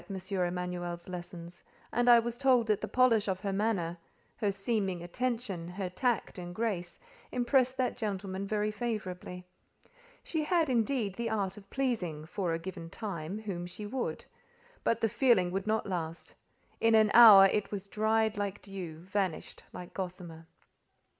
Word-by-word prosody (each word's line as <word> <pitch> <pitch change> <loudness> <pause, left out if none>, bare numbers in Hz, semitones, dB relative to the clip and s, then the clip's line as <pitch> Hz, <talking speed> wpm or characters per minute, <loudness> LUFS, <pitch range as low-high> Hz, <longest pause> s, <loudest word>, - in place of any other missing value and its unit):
Emanuel's 180 -2 -2
lessons, 175 -1 -8 0.3
and 245 +1 +2
I 240 - +9
was 235 0 0
told 250 -2 +3
that 215 -2 +1
the - - -3
polish 240 -5 +3
of 185 -1 -1
her 200 -2 -2
manner, 190 -5 -1 0.4
her 205 -2 +1
seeming 195 -3 -1
attention, 220 -3 -3
her 180 +1 -4
tact 235 -1 -1
and 175 0 -7
grace, 190 -6 -2 0.3
impressed 255 +1 +2
that 255 -1 0
gentleman 200 -3 -3
very 210 0 0
favourably. 190 -5 -5 0.8
She 320 -2 -2
had, 325 -3 +2
indeed, 230 -3 +1
the 230 +3 -3
art 200 -4 -1
of 200 -2 -14
pleasing, 190 - -2
for 175 +1 -2
a 165 - 0
given 170 -1 -7
time, 185 -3 -5
whom 180 -5 -4
she 180 +4 -7
would; 245 +4 -3 0.6
but 230 - +1
the 225 - +3
feeling 220 -6 +3
would 195 +2 -3
not 220 0 +1
last: 165 -4 -4 0.5
in 225 0 +4
an 215 -1 +5
hour 215 -5 +10
it 205 +1 +1
was 200 -1 -5
dried 220 +1 +1
like 200 -1 -2
dew, 180 -5 -7
vanished 190 -2 -3
like 180 - -9
gossamer. 175 -3 -6
200 Hz, 155 wpm, -31 LUFS, 180-225 Hz, 0.8 s, hour